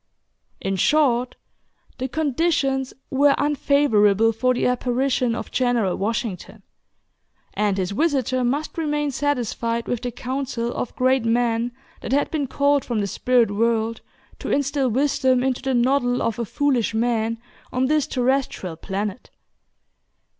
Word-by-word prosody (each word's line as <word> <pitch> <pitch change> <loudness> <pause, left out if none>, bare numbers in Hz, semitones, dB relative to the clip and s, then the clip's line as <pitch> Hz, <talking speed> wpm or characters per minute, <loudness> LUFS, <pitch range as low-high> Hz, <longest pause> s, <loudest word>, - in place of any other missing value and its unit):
In 195 0 -2
short, 255 -1 +2 0.6
the 260 - -1
"conditions" 275 -2 0 0.2
were 280 +1 +4
unfavorable 230 -7 +3
for 255 +3 +1
the - - 0
apparition 250 -1 +1
of - - -6
"General 240 -7 +1
Washington;" 205 -1 -4 0.9
and 205 -2 0
his 185 0 -1
visitor 260 -1 0
must 290 +7 -2
remain 295 -2 -1
satisfied 240 -4 -1
with 245 -2 -2
the 245 - -2
council 250 -1 -3
of 245 - -4
great 260 -1 +2
men 230 0 +1 0.3
that 240 - -3
had 285 - +1
been 295 -4 -1
called 285 +1 +2
from 235 - -3
the 205 - 0
spirit 235 +2 +2
world 225 +1 0 0.4
to - - -5
instill 280 -1 +1
wisdom 260 0 +2
into 260 -1 -1
the 265 -1 -1
noddle 245 0 +2
of 230 0 -1
a 235 - -1
foolish 250 -2 0
man 230 0 0 0.3
on 255 +1 +1
this 300 +1 +1
terrestrial 250 -9 -1
planet. 200 +5 -4
250 Hz, 135 wpm, -22 LUFS, 230-275 Hz, 0.9 s, were